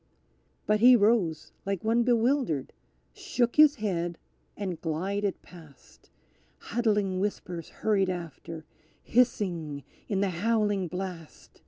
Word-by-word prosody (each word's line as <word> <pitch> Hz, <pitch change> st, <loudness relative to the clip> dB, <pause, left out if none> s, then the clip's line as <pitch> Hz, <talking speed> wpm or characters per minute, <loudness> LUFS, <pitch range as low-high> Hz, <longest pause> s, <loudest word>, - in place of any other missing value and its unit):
_" -, -, -40 dB, 0.6 s
But 210 Hz, 0 st, +2 dB
he 250 Hz, +3 st, +8 dB
rose 205 Hz, -8 st, +2 dB
like 195 Hz, -2 st, -3 dB
one 225 Hz, +2 st, +2 dB
bewildered, 235 Hz, -, +1 dB, 0.4 s
shook 340 Hz, -, -1 dB
his 300 Hz, -1 st, +7 dB
head 175 Hz, -, -2 dB, 0.4 s
and 185 Hz, -5 st, -4 dB
glided 190 Hz, +5 st, -2 dB
past; 160 Hz, -6 st, -17 dB, 0.5 s
Huddling 210 Hz, -5 st, 0 dB
whispers 180 Hz, -4 st, -4 dB
hurried 200 Hz, -3 st, 0 dB
after, 165 Hz, -2 st, -6 dB, 0.4 s
hissing 175 Hz, -, 0 dB, 0.2 s
in 195 Hz, -2 st, 0 dB
the 200 Hz, -2 st, +1 dB
howling 205 Hz, 0 st, 0 dB
blast! 180 Hz, -2 st, -8 dB
195 Hz, 115 wpm, -28 LUFS, 170-225 Hz, 0.6 s, he